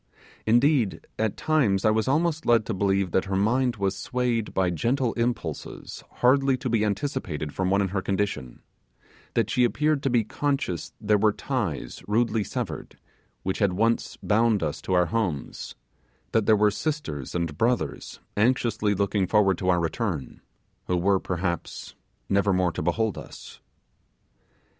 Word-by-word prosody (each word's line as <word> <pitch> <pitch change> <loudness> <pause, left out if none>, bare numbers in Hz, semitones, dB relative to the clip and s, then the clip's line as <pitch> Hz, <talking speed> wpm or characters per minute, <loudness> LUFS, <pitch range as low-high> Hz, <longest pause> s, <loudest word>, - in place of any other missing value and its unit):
Indeed, 120 -1 +3
at 110 -2 0
times 130 -12 +2
I 110 - +5
was 110 +2 +1
almost 160 +3 +1
led 115 -2 +4
to 115 - -2
believe 95 -1 +1
that 95 - +1
her 95 -1 -2
mind 120 +5 +2
was 100 -2 -1
swayed 120 +2 -1
by 95 -2 +1
gentle 120 - 0
impulses 120 0 -4 0.2
hardly 135 +1 +4
to 125 - -3
be 115 -2 +2
anticipated 100 - -2
from 95 -1 -1
one 100 +1 +3
in 95 - -1
her 95 +1 -1
condition; 95 -11 -3 0.7
that 115 -1 +1
she 125 -1 +3
appeared 150 +4 +2
to 135 - 0
be 120 -2 +3
conscious 135 - -2
there 105 -1 +2
were 110 +1 +4
ties 105 - -3
rudely 110 0 +1
severed, - - -5 0.5
which 95 - -2
had 100 -4 +2
once 115 +5 0
bound 110 -2 +2
us 75 -2 -3
to 95 - -2
our 90 -1 +4
homes; 90 -6 -3 0.6
that 110 -2 +1
there 110 -1 +6
were 105 0 +4
sisters 100 - -4
and 85 -3 -1
brothers 120 +7 -1 0.2
anxiously 110 -2 +2
looking 100 -1 +1
forward 100 -3 +3
to 95 - 0
our 90 -1 +4
return, 85 - -3 0.5
who 90 - +1
were, 95 +2 +3
perhaps, 90 -2 -4 0.3
never 100 +1 +2
more 90 -1 +2
to - - -4
behold 100 +7 0
us. - - -11
105 Hz, 155 wpm, -26 LUFS, 95-120 Hz, 0.7 s, there